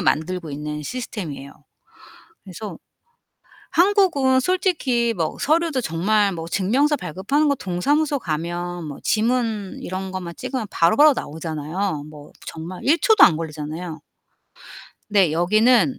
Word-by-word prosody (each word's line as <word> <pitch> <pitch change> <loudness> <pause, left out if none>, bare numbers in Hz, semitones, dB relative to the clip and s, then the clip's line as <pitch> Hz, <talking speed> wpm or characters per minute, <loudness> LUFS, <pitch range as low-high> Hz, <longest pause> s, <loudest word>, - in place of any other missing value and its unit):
만들고 170 0 -1
있는 150 +1 -5
시스템이에요. 165 - -6 0.9
그래서 195 +2 -8 0.9
한국은 345 -9 +3
솔직히 270 -9 +1
뭐 165 -4 -2
서류도 310 -1 +1
정말 200 +4 +1
뭐 165 -2 -6
증명서 255 - +2
발급하는 195 - 0
거 285 - +3
동사무소 280 - 0
가면 175 - -4
뭐 145 -2 -7
지문 220 -3 0
이런 190 +1 -4
것만 180 -2 -5
찍으면 255 -3 -4
바로바로 290 - +5
나오잖아요. 160 - -4
뭐 150 -1 -13
정말 165 +3 -7
1 310 +5 +4
초도 440 +2 +6
안 165 - +4
걸리잖아요. 160 +1 -6 1.1
근데 195 -6 +4
여기는 220 - +3
190 Hz, 285 characters per minute, -22 LUFS, 165-260 Hz, 1.1 s, 초도